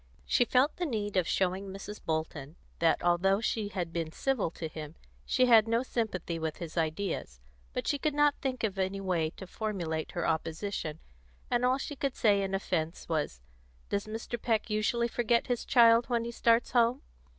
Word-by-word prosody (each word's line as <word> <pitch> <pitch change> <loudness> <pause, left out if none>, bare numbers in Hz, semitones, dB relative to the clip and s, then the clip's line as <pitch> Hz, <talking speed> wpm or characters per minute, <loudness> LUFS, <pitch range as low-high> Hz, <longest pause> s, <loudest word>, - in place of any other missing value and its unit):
She 245 - +3
felt 260 +5 +2
the 355 - -1
need 210 -6 -2
of 180 -3 +2
showing 190 +1 0
Mrs. 195 +2 -8
Bolton 155 -2 -3 0.2
that, 165 -1 +2
although 180 +3 +3
she 220 -2 -1
had 180 -4 -4
been 165 -2 -2
civil 260 -2 0
to 160 0 -6
him, 155 0 -8 0.3
she 255 - +3
had 225 -3 +6
no 230 +2 +2
sympathy 185 -9 -2
with 160 -1 -3
his 165 -2 -7
ideas; 160 - -2 0.3
but - - -3
she 285 - +1
could 300 +1 0
not 295 0 +4
think 255 -3 -2
of 200 -3 -1
any 190 +1 -1
way 175 -5 0
to 190 - -7
formulate 175 -6 -3
her 175 - -1
opposition, 160 0 -2 0.5
and 245 0 +2
all 255 +1 +3
she 290 +2 -5
could 275 -1 -2
say 205 -3 +3
in 195 0 -1
offence 170 -4 -2
was, 150 - -2 0.5
"Does 200 +1 -1
Mr. 225 +1 -5
Peck 225 -1 0
usually 225 +3 +1
forget 235 0 +1
his 245 -2 -2
child 235 -1 +6
when 235 -1 +1
he 235 - -4
starts 230 0 +2
home?" 240 +1 +3
200 Hz, 185 wpm, -30 LUFS, 170-235 Hz, 0.5 s, had